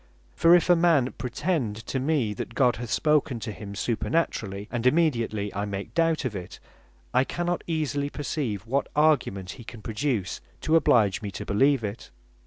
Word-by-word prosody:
For 170 +1 +6
if 175 - +3
a 175 - +6
man 165 -7 +3
pretend 125 - -1
to 135 - -2
me, 130 -6 0
that 115 - -6
God 125 -3 +3
hath 120 -1 -6
spoken 150 -3 +1
to 110 - -4
him 100 -1 -8
supernaturally, 105 -4 -1
and 120 0 0
immediately, 115 -9 +1
and 100 - -3
I - - -1
make 100 -1 -5
doubt 165 -3 +1
of 115 -5 -2
it, 90 -2 -7 0.6
I 130 - +4
cannot 175 +4 -2
easily 145 -3 -1
perceive 135 - -3
what 135 +4 0
argument 130 -12 +2
he 120 - -10
can 115 -1 -11
produce, 110 -3 -2 0.2
to 160 - +2
oblige 115 -8 +4
me 105 - -4
to - - -7
beleeve 135 +4 +3
it. 105 +1 -5
125 Hz, 180 wpm, -26 LUFS, 105-155 Hz, 0.6 s, For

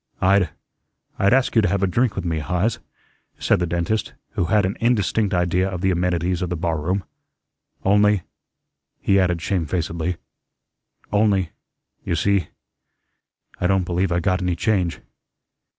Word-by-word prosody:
"I'd 95 -2 +3 0.7
I'd 100 +1 +3
ask 130 0 +2
you 115 - +6
to 105 - +2
have 100 +1 0
a - - +5
drink 110 +4 +1
with - - -4
me, 80 -2 -1
Heise," 90 +8 -1 0.6
said - - +2
the 90 - 0
dentist, 85 +6 -1 0.2
who 90 - -1
had 105 +3 +3
an 95 - -2
indistinct 110 -3 +1
idea 90 +1 +1
of 90 -2 -5
the 95 0 +2
amenities 90 0 0
of 90 - -2
the 90 - -1
barroom, 85 +3 -1 0.8
"only," 105 -1 +4 0.8
he 100 0 +3
added 90 -3 +1
shamefacedly, 85 -1 -1 1.0
"only 100 -4 +2 0.5
you - - -1
see, 95 0 +1 1.1
I 90 - +1
don't 95 0 +2
believe 90 +1 0
I 85 - +2
got 90 +1 0
any 90 -1 0
change." 90 -2 0
90 Hz, 150 wpm, -22 LUFS, 85-100 Hz, 1.1 s, you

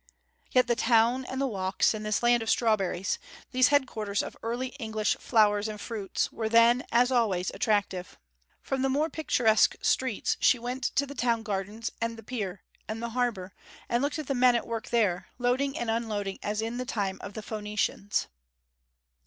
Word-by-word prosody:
Yet 255 -1 +4
the 240 -1 +1
town 235 +2 +3
and 260 +1 -5
the 275 - +1
walks 190 -5 +1
in 215 - -5
this 215 +2 -1
land 240 0 +4
of 225 - -3
strawberries, 195 -5 +1 0.3
these 255 -1 +5
headquarters 225 -8 0
of - - -7
early 240 +3 -2
English 220 -3 0
flowers 210 -2 +3
and 215 -1 -6
fruit, 210 -3 -2
were 220 -1 -3
then, 235 +3 +5
as 245 +2 +4
always, 205 -7 +1
attractive. 200 -4 -1 0.5
From 270 -1 -2
the 270 - +2
more 300 +4 +1
picturesque 225 -8 +3
streets 260 -5 +1
she - - +5
went 245 +2 -4
to 280 - +3
the 280 - -8
town 235 -4 0
gardens, 210 +2 -3
and 230 0 -2
the 225 - -11
Pier, 205 -5 -5 0.2
and 220 +1 -4
the 235 0 -3
Harbour, 230 -6 -2 0.3
and 235 +1 +1
looked 285 +2 -1
at 310 - -4
the 275 - -1
men 250 -1 +4
at 235 - 0
work 230 +1 -5
there, 195 -7 +1
loading 260 +3 0
and 235 -2 -1
unloading 210 -4 -2
as 210 +1 -2
in 230 +2 -3
the 255 - -3
time 200 -5 -2
of 200 - -8
the 215 - -6
Phoenicians. 210 -2 -2
230 Hz, 185 wpm, -28 LUFS, 210-250 Hz, 0.5 s, these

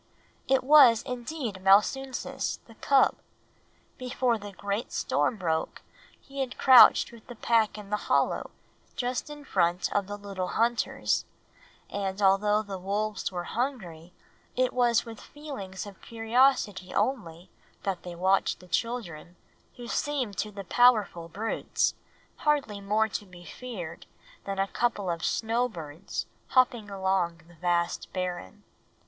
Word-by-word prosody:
It 265 -1 +3
was 265 -5 +7
indeed 245 -5 -5
Malsunsis, 265 +7 +2
the 230 - -15
cub. 270 +4 +3 0.8
Before 250 -2 0
the 205 0 -8
great 200 +4 -4
storm 230 - 0
broke 160 -4 -2 0.4
he 275 0 -10
had 260 -2 -3
crouched 260 -3 +7
with 230 -2 -15
the 245 - -9
pack 225 -1 +1
in 205 -1 -10
the 210 - +2
hollow - - +1 0.5
just 250 +2 -2
in 295 -1 -10
front 175 -5 +1
of 200 -2 0
the 205 0 -5
little 195 -3 -5
hunters; 235 +3 0 0.6
and 195 -1 -3
although 205 +2 +3
the 195 -3 -6
wolves 205 +3 -2
were 175 -1 -4
hungry, 180 - -4 0.4
it 255 0 +1
was 240 -2 +3
with 225 -2 -9
feelings 240 -12 -8
of 200 -2 -12
curiosity 225 -4 +1
only 200 -7 -2 0.3
that 190 -3 -2
they 175 -1 -8
watched 190 +3 +1
the 180 - -15
children, 180 -6 -3 0.4
who 240 -1 -9
seemed 265 -7 -2
to 215 - -1
the 200 -1 -8
powerful 210 -6 +3
brutes 215 +7 -1 0.4
hardly 280 -9 0
more 210 +2 +1
to 210 -1 -5
be 175 -1 -14
feared 180 -11 -8 0.4
than 195 0 -4
a 195 0 +1
couple 205 -5 -1
of 170 0 -4
snowbirds 205 -8 -2 0.2
hopping 245 -5 +2
across 190 -3 0
the 175 - -17
vast 170 0 -1
barren. 180 - -4
210 Hz, 135 wpm, -28 LUFS, 185-245 Hz, 0.8 s, was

